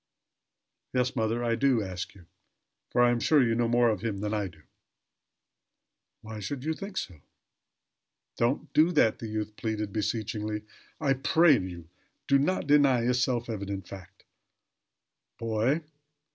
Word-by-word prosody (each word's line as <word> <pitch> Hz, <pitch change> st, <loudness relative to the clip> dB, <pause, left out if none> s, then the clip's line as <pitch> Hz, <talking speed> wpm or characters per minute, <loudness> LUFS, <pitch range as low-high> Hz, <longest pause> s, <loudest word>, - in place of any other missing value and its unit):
"Yes, 125 Hz, +1 st, +1 dB
mother, 115 Hz, 0 st, 0 dB
I 120 Hz, -1 st, +1 dB
do 120 Hz, -1 st, +2 dB
ask 95 Hz, 0 st, -6 dB
you; 90 Hz, -3 st, -16 dB, 0.6 s
for 120 Hz, -, +3 dB
I 120 Hz, -, +5 dB
am 120 Hz, -, 0 dB
sure 150 Hz, +5 st, +4 dB
you 115 Hz, -2 st, +2 dB
know 120 Hz, +1 st, +1 dB
more 120 Hz, 0 st, +3 dB
of 105 Hz, -4 st, -3 dB
him 110 Hz, -3 st, -2 dB
than 105 Hz, 0 st, -2 dB
I 105 Hz, -2 st, -1 dB
do." 80 Hz, -4 st, -16 dB, 1.6 s
"Why 110 Hz, 0 st, -8 dB
should 125 Hz, +6 st, -5 dB
you 160 Hz, +2 st, 0 dB
think 195 Hz, +3 st, -8 dB
so?" 85 Hz, -6 st, -5 dB, 1.1 s
"Don't 120 Hz, +4 st, -1 dB
do 155 Hz, +4 st, +5 dB
that!" 115 Hz, -8 st, +3 dB
the 115 Hz, -, -5 dB
youth 105 Hz, -1 st, -4 dB
pleaded, 105 Hz, -3 st, -3 dB
beseechingly. 105 Hz, -1 st, -2 dB, 0.4 s
"I 135 Hz, -, +2 dB
pray 150 Hz, +3 st, +4 dB
you 85 Hz, -3 st, -7 dB, 0.4 s
do 140 Hz, 0 st, +4 dB
not 180 Hz, +6 st, 0 dB
deny 140 Hz, -4 st, +4 dB
a 120 Hz, +2 st, +2 dB
self 125 Hz, -1 st, 0 dB
evident 100 Hz, -4 st, -5 dB
fact." 95 Hz, 0 st, -12 dB, 1.1 s
"Boy!" 115 Hz, +7 st, 0 dB
115 Hz, 150 wpm, -28 LUFS, 105-130 Hz, 1.6 s, I